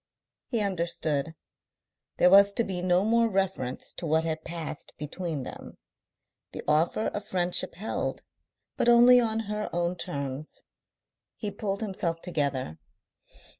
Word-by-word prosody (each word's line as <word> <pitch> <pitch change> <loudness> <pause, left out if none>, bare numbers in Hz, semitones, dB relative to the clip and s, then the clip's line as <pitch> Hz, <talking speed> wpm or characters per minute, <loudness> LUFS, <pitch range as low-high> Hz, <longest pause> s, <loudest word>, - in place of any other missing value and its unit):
He 235 -4 0
understood. 165 -5 -1 0.8
There 180 - +5
was 200 +1 +7
to 235 - +1
be 185 -4 -3
no 180 +1 +3
more 230 +1 +3
reference 190 - -2
to 170 - -3
what 160 +1 +2
had 160 -1 -3
passed 160 -3 -6
between 155 -1 -4
them. - - -9 0.8
The - - -6
offer 160 +8 +2
of 205 - -5
friendship 180 -1 0
held, 210 +6 -3 0.5
but - - +3
only 240 +1 +8
on 225 -2 +1
her 210 0 -3
own 175 +1 0
terms. 140 -5 -5 0.7
He 210 -3 -4
pulled 200 0 -3
himself 185 -5 -2
together. 140 - -2
180 Hz, 130 wpm, -28 LUFS, 160-205 Hz, 0.8 s, only